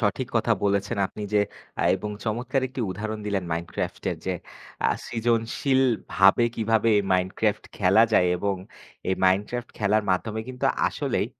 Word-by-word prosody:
সঠিক 115 +3 0
কথা 115 +1 +2
বলেছেন 100 0 +1
আপনি। - - -11
যে - - +5 0.4
আ - - +1
এবং 105 +3 -5
চমৎকার 120 +5 -1
একটি 130 0 -6
উদাহরণ 110 +3 -4
দিলেন 100 -3 -1
মাইনক্রাফটের। 85 +1 -3
যে 95 - +1 0.5
আ - - +5 0.2
সৃজনশীলভাবে 115 -2 +2
কীভাবে 110 0 +2
এ - - +2
মাইনক্রাফট 95 +3 0
খেলা 100 +3 +5
যায় 90 - +5
এবং 100 +1 -1 0.5
এই 95 - +2
মাইনক্রাফট 105 +6 +1
খেলার 105 +1 +2
মাধ্যমে 110 +4 -1
কিন্তু 130 0 -2 0.2
আসলেই - - -1
105 Hz, 140 wpm, -25 LUFS, 95-115 Hz, 0.5 s, যে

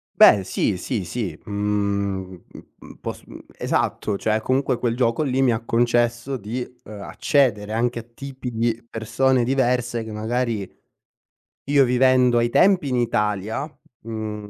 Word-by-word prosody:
Beh 100 -2 +7
sì, 95 +1 -1
sì, 100 +1 -3
sì, 90 -4 -4
mhmm, 100 -3 -2 0.6
pos - - -5
mhmm, - - -10 0.2
esatto, 105 -2 -1
cioè 110 +1 0
comunque 130 +1 0
quel 115 -2 0
gioco 120 +1 +1
lì, 135 -2 +1
mi 125 - +4
ha 115 0 -2
concesso 120 +2 +1
di, 120 +3 -4 0.2
uhm, 105 -1 -9
accedere 110 -3 +1
anche 120 +1 0
a - - -5
tipi 130 +3 -8
di 115 0 -1
persone 120 +3 +1
diverse, 125 -2 0
che 110 - -8
magari 110 -1 -2 1.0
io 140 -1 +6
vivendo 125 -1 +4
ai 120 0 +2
tempi 180 -4 +4
in 125 - 0
Italia, 105 0 -1 0.4
mhmm, 110 -2 -5
115 Hz, 140 wpm, -22 LUFS, 105-125 Hz, 1.0 s, Beh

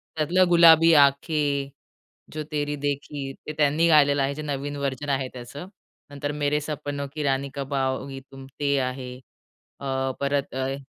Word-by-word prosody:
त्यातलं 170 +4 +3
गुलाबी 165 -1 +7
आँखें, 140 -1 +2 0.6
जो 155 0 -4
तेरी 145 -1 -1
देखी 145 -1 -4 0.2
ते 155 - -4
त्यांनी 150 +3 +3
गायलेलं 145 -3 +5
आहे, 135 +1 0
जे 155 - -6
नवीन 145 -1 -4
व्हर्जन 140 0 -3
आहे 135 -1 0
त्याचं. 130 +7 -9 0.4
नंतर 145 0 -4
मेरे 145 +1 +1
सपनों, 145 -1 -4
की 155 - -4
रानी 135 0 0
कब 140 0 -5
आओगी 135 0 -2
तुम 135 0 -11
ते 140 -1 +1
आहे. 130 -1 -4 0.7
अ, 135 -1 -2
परत 140 -1 -1
अय 130 +1 -2
140 Hz, 155 wpm, -25 LUFS, 135-150 Hz, 0.7 s, गुलाबी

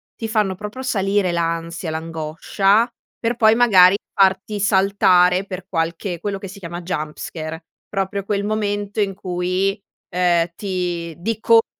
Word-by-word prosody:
ti 225 - -5
fanno 210 -4 +1
proprio 210 +7 -7
salire 195 -6 +1
l'ansia, 170 0 -2
l'angoscia 165 +7 0 0.3
per 235 +1 -1
poi, 220 -1 +5
magari, 195 -6 +6 0.2
farti 195 +1 +2
saltare 190 -2 +4
per 190 -2 -7
qualche 170 0 -2
quello 200 +2 -3
che 195 - -8
si 200 - -11
chiama 175 -1 -6
jumpscare. 160 0 -5 0.2
Proprio 195 0 -2
quel 200 0 -1
momento 205 -1 -2
in 195 -1 0
cui, 185 +2 -1 0.3
uhm, 175 -1 +2
ti 175 -4 -3
di 215 +5 -3
colpo 230 0 +5
190 Hz, 135 wpm, -21 LUFS, 175-205 Hz, 0.3 s, magari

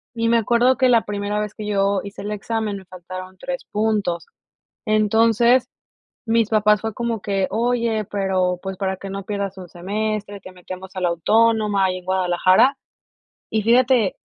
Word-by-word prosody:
Y 230 0 0
me 230 0 +4
acuerdo 240 +3 +3
que 260 - +3
la 235 -2 +4
primera 205 0 -3
vez 210 -1 -4
que 215 - -7
yo 200 -1 +1
hice 200 0 -9
el 205 - -4
examen 210 0 -3
me 190 - -13
faltaron 185 +1 -9
3 265 +6 -5
puntos. 210 -5 -1 0.6
Entonces, 225 +3 +3 0.6
mis 225 -1 +2
papás 210 -1 +3
fue 220 0 -3
como 235 -1 -2
que: 195 -1 -1
"Oye, 230 0 0
pero, 190 -3 0
pues, 190 -1 -5
para 190 0 -2
que 195 +1 -8
no 195 0 -5
pierdas 200 -1 -4
un 180 -1 -9
semestre, 205 +3 -4
te 185 - -12
metemos 185 +1 -9
a 185 - -4
la 180 - +2
Autónoma 210 +3 +2
ahí 185 -1 0
en 180 - -14
Guadalajara", 185 +6 +3 0.7
y 220 - 0
fíjate, 240 -2 +3
205 Hz, 170 wpm, -21 LUFS, 190-225 Hz, 0.7 s, me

